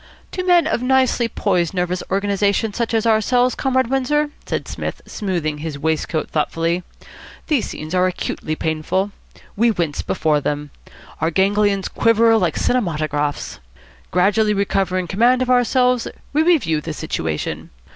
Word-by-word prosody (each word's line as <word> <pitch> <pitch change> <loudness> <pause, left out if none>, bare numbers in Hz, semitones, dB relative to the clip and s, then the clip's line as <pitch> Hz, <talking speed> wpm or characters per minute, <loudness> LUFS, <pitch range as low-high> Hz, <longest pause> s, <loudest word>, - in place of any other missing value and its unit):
"To 365 - -3
men 355 -2 +4
of - - 0
nicely 255 -2 +2
poised 180 -5 0
nervous 180 0 -1
organisation 200 +2 +1
such 235 +1 -2
as 225 0 +1
ourselves, 245 +3 +3
Comrade 260 -1 +1
Windsor," 295 +3 +1 0.2
said - - -3
Psmith, - - -5
smoothing 170 -8 -3
his 155 -2 -5
waistcoat 160 +1 -1
thoughtfully, 165 +3 0 0.6
"these 295 -7 0
scenes 155 +2 -7
are 185 0 +3
acutely 160 -3 -3
painful. 160 +6 -1 0.4
We 235 +3 +3
wince 170 -9 -1
before 150 -2 0
them. 145 0 -3 0.5
Our 160 - +1
ganglions 195 +2 +2
quiver 230 0 +3
like 175 -5 0
cinematographs. 155 -10 -1 0.5
Gradually 210 +4 +2
recovering 190 -2 0
command 245 +7 +3
of 255 - -1
ourselves, 250 0 +3 0.3
we 300 - +3
review 255 - +2
the 160 0 -5
situation. 80 - -3
195 Hz, 135 wpm, -20 LUFS, 160-240 Hz, 0.6 s, men